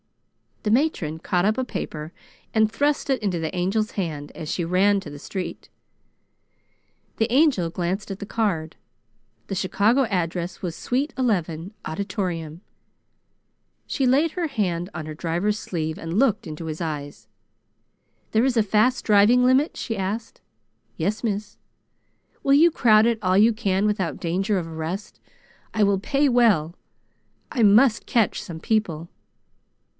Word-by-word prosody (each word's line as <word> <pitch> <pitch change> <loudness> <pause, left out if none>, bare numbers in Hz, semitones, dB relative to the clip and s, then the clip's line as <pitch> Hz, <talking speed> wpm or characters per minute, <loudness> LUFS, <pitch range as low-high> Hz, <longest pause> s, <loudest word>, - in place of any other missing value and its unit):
The 210 - 0
matron 220 - +1
caught 175 +2 0
up 215 +1 +2
a - - +1
paper 160 -8 -5 0.4
and 220 -1 +3
thrust 285 +4 0
it 265 -3 +1
into 190 -5 -1
the 160 +1 -3
Angel's 195 +5 0
hand 155 -7 -4
as 155 - -7
she 175 - -1
ran 195 +4 +3
to 175 - -9
the 145 - -9
street. 185 +3 -6 1.5
The 225 +1 0
Angel 260 - +3
glanced 180 +4 -3
at 195 - -5
the - - -5
card. 180 -9 -1 0.7
The 195 - -3
Chicago 210 +7 +2
address 175 -3 -2
was 170 -3 -3
Suite 275 +4 -1
Eleven, 180 -6 -1
Auditorium. 170 -2 -4 1.3
She 270 - 0
laid 290 +6 +3
her 345 -1 -2
hand 185 - -2
on 155 - -5
her 155 - -5
driver's 175 +6 -1
sleeve 160 -6 -4
and 165 +3 -4
looked 220 -6 +2
into 155 +1 -7
his 155 +1 -5
eyes. 145 -8 -5 1.0
"There 225 +3 +3
is 260 -3 +1
a 225 - +5
fast 215 +5 +2
driving 215 +4 +5
limit?" 260 +5 +3
she 225 -3 -3
asked. 205 +4 -4 0.6
"Yes, 205 +8 -1
miss." 210 -2 -3 0.9
"Will 275 - +3
you 330 +4 +6
crowd 220 -7 +5
it 230 -2 +1
all 185 -1 +2
you 220 +3 +5
can 200 -3 0
without 195 -5 -1
danger 190 +5 0
of 170 -3 -3
arrest? 165 +5 -5 0.6
I 215 - +3
will 200 -1 +3
pay 275 +8 +1
well. 215 - +3 0.8
I 250 - -1
must 220 +3 +5
catch 230 -5 +1
some 165 -2 -8
people!" 170 -5 -1
200 Hz, 150 wpm, -24 LUFS, 170-230 Hz, 1.5 s, you